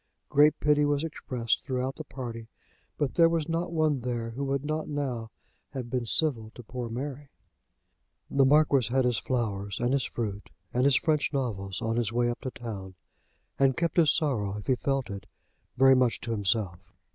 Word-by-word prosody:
Great 150 +1 +5
pity 150 0 +3
was 145 0 +1
expressed 125 -7 -2
throughout 130 0 -2
the 155 - -6
party, 120 -5 -7 0.5
but 145 -3 0
there 165 -1 +5
was 165 -2 0
not 165 +1 -1
one 155 -4 +2
there 120 -2 -3
who 130 +5 -4
would 140 0 -1
not 155 +1 -2
now 130 -6 -3 0.4
have 125 -3 -5
been 125 -2 -1
civil 115 -6 +1
to 120 - -10
poor 120 +1 -5
Mary. 135 +4 -5 1.0
The 140 0 +3
Marquis 140 -4 +4
had 130 0 +3
his 120 -2 +2
flowers, 100 -6 -2
and 120 +2 +1
his 140 -3 +1
fruit, 105 -3 -4 0.2
and 125 +2 +2
his 140 -2 +5
French 155 -1 +1
novels 105 -9 -3
on 115 +1 0
his 115 -3 0
way 120 0 +1
up 120 - -7
to 130 - -3
town, 100 -7 -7 0.6
and 135 -2 +3
kept 170 -1 -1
his 165 -3 +6
sorrow, 105 -10 0
if 105 - -8
he 130 - +3
felt 135 -1 -1
it, 100 0 -7 0.5
very 135 +1 +7
much 125 -2 +2
to 115 - -4
himself. 100 -4 0
130 Hz, 185 wpm, -28 LUFS, 115-145 Hz, 1.0 s, very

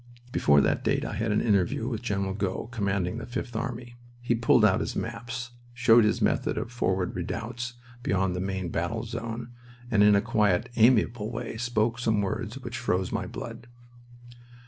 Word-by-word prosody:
Before 70 -9 +4
that - - +1
date - - +1
I - - -4
had 110 -1 -1
an 105 - +2
interview 105 +1 +1
with 115 -4 -3
General 100 -5 -1
Gough, 100 +2 -3
commanding 100 -2 -1
the 115 - -7
Fifth 120 -1 -5
Army. 120 0 -4 0.2
He 120 0 0
pulled 115 -1 +4
out 95 -3 +4
his - - -3
maps, 120 +2 -4 0.2
showed 115 -1 +6
his 105 - +1
method - - +1
of 115 - -3
forward 95 -6 -1
redoubts 120 +7 -4 0.3
beyond 95 -4 0
the - - -2
main 95 -2 -2
battle 85 +8 -2
zone, 115 +1 -5 0.4
and 105 -3 +4
in 105 0 +7
a - - +5
quiet, 105 0 +1
amiable 115 -2 +3
way 120 -1 -5
spoke 115 0 0
some 110 -3 +1
words 110 +4 -3
which 120 -2 -6
froze 95 -7 0
my - - -2
blood. 120 - -8
115 Hz, 175 wpm, -27 LUFS, 100-120 Hz, 0.4 s, in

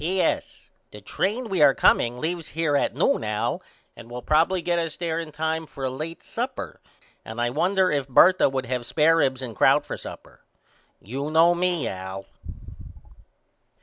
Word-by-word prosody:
P.S. 180 +4 -2 0.2
The 105 - -11
train 210 - -2
we 190 -6 -1
are 140 -2 +6
comeing 120 - +3
on 125 - -10
leaves 165 0 -3
here 160 -3 -1
at - - 0
noon - - +1
Al 105 -1 -2 0.3
and 115 - -12
will 120 0 -7
probily 165 +4 +2
get 175 -1 +1
us 165 -2 -4
there 165 -2 -2
in 165 -2 -6
time 160 +1 -2
for 135 - -9
a 130 - -1
late 155 +5 -6
supper - - -5 0.4
and 110 +1 -8
I 120 0 0
wonder 185 +6 +2
if 140 -2 -1
Bertha 180 +7 +5
would 130 -1 -3
have 125 0 -2
spair 155 +6 +3
ribs 130 -4 +1
and 115 -4 -6
crout - - +4
for - - -5
supper. - - -11 0.6
You 135 +8 -4
know 165 +2 +5
me 175 -6 0
Al. 95 0 -6
155 Hz, 180 wpm, -24 LUFS, 125-170 Hz, 0.6 s, are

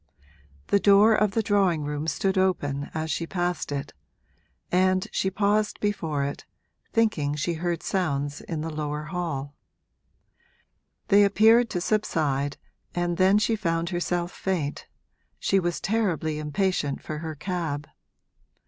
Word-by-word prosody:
The 200 - +4
door 205 +2 +6
of 210 -2 +2
the 225 - +1
drawing 195 -7 +2
room 150 +1 -3
stood 190 +3 0
open 145 -7 0
as 160 0 -2
she 165 - -2
passed 175 -3 -2
it, 140 -1 -4 0.8
and 185 +1 +2
she 190 - 0
paused 205 +2 +1
before 160 -9 -1
it, 140 +1 -4 0.5
thinking 165 -11 +1
she 150 +4 -1
heard 170 +1 -2
sounds 145 -6 -1
in 160 -3 -4
the 160 +1 -4
lower 150 -1 -3
hall. 150 -4 -4 1.6
They 205 +1 +7
appeared 225 +4 +5
to 180 - -2
subside 145 -9 0 0.4
and 175 -1 0
then 190 +2 +5
she 220 +2 +2
found 170 -4 -1
herself 175 0 -1
faint 170 -7 -3 0.5
she 195 - +2
was 175 -1 -1
terribly 175 -8 0
impatient 150 -1 -1
for 155 -1 -5
her 160 -1 -5
cab. 150 -3 -3
175 Hz, 135 wpm, -26 LUFS, 150-195 Hz, 1.6 s, They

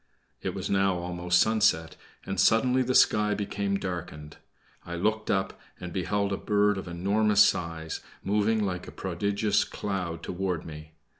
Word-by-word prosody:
It - - -3
was - - -4
now 95 -2 +2
almost 90 0 0
sunset, 110 -7 +2 0.3
and 95 -1 -3
suddenly 125 +3 +4
the 130 0 0
sky 105 0 +4
became 100 -1 -2
darkened. 85 -5 -6 0.5
I 85 - -6
looked 110 +5 -1
up 95 0 -1 0.2
and 90 -1 -7
beheld 100 +2 -1
a - - -1
bird 105 -1 +1
of 95 - -8
enormous 100 +4 +3
size, 80 -2 -2 0.2
moving 105 +2 +1
like 90 -2 -4
a - - -8
prodigious 100 +3 0
cloud 90 -5 -4
toward 90 -2 -3
me. 75 0 -10
95 Hz, 150 wpm, -27 LUFS, 85-105 Hz, 0.5 s, suddenly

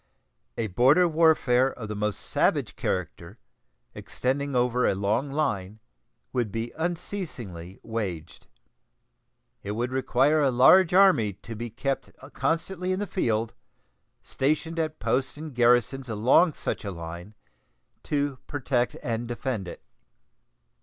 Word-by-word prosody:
A 115 - -1
border 130 - +4
warfare 155 -6 +3
of 110 - -8
the 105 - -5
most 105 0 -2
savage - - 0
character, 90 +2 -4 0.6
extending 140 +2 -2
over 125 0 +2
a - - +1
long 105 +8 0
line, 110 -9 -2 0.5
would 120 -5 -1
be 115 +2 -4
unceasingly 160 - -5
waged. 95 -8 -5 1.1
It 100 - -4
would 120 +3 -2
require 135 +3 +2
a 140 - +3
large 160 +9 +6
army 180 - +5
to 115 +4 -10
be 120 +2 -5
kept 135 +5 -3 0.2
constantly 180 +2 -1
in 185 - 0
the 205 - -1
field, 115 - -1 0.7
stationed 155 +4 -1
at 155 -1 -2
posts 130 +2 -1
and 155 -1 -7
garrisons 125 +2 +2
along 125 +10 +4
such - - -3
a 100 - -4
line, 85 +3 -8 0.7
to 145 -3 -2
protect 125 -4 -1
and 115 0 -2
defend 120 -4 -3
it. - - -9
125 Hz, 125 wpm, -26 LUFS, 110-150 Hz, 1.1 s, large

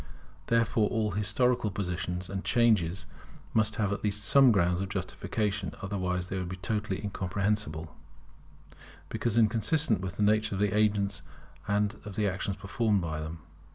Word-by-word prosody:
Therefore 115 -2 +2
all 110 -3 0
historical 110 +3 +1
positions 90 -2 -3
and 95 +1 -4
changes 95 -7 +2 0.5
must 110 -1 +2
have 100 -2 0
at - - -5
least 105 0 0
some 135 +1 +7
grounds 90 -3 +2
of 95 - -3
justification; 100 +1 -2
otherwise 90 -3 -1
they 95 +1 -4
would 90 -1 -4
be 95 - -4
totally 105 0 -2
incomprehensible, 95 -4 -2 1.1
because 115 -1 -1
inconsistent 115 - +2
with 95 -2 -4
the 105 - +1
nature 105 0 +2
of - - -3
the 105 0 +1
agents 105 -2 +1 0.5
and 105 +1 +1
of 105 -2 -8
the 105 0 +1
actions 95 +1 -2
performed 105 +1 +1
by 80 -2 -3
them. 80 +1 -6
100 Hz, 155 wpm, -29 LUFS, 95-110 Hz, 1.1 s, some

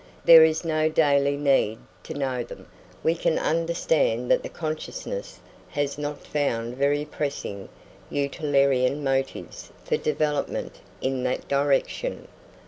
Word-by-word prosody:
There 165 -1 +10
is 160 +1 +2
no 155 -1 +1
daily 140 -2 +3
need 135 -6 +2 0.3
to - - -6
know 130 -3 -1
them, - - -10
and - - -25
we 160 - +3
can 165 -1 0
understand 160 -7 +1
that - - +4
the - - -6
consciousness 335 - -5 0.3
has 145 0 -2
not 145 0 -5
found 120 -5 -1
very 145 +2 +1
pressing 140 -10 -4 0.4
utilitarian 140 -1 +1
motives 135 -1 -2
for - - +1
development 150 -1 -2 0.2
in 130 -1 -1
that 125 - -2
direction. 140 - 0
145 Hz, 130 wpm, -25 LUFS, 135-155 Hz, 0.4 s, There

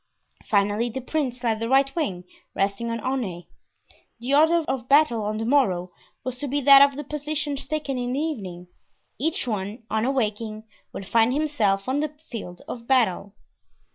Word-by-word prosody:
Finally, 205 +3 +2
the 265 - -4
prince 255 -2 -3
led 225 -2 +1
the 230 +1 -2
right 270 +1 +3
wing, 195 - -2 0.3
resting 200 +4 -1
on 230 0 -2
Aunay. 215 -10 -3 0.7
The 250 +4 -2
order 320 +3 +5
of 255 -2 -3
battle 275 -6 +4
on 210 +1 -2
the 225 - -2
morrow 195 -10 +2 0.3
was 255 -1 -5
to 290 - -3
be 285 +2 0
that 275 0 +9
of 280 -1 +5
the 295 - -4
positions 295 -1 -3
taken 290 -4 -2
in 245 0 -2
the 270 - -1
evening. 195 - -4 0.5
Each 320 +2 -1
one, 210 +1 -3
on 220 0 +1
awaking, 220 -4 -1 0.3
would 195 - -7
find 225 +5 +3
himself 220 -11 +1
on 265 +2 0
the 305 +1 0 0.2
field 180 -7 -7
of 235 -1 -7
battle. 210 -6 +1
245 Hz, 170 wpm, -24 LUFS, 210-280 Hz, 0.7 s, that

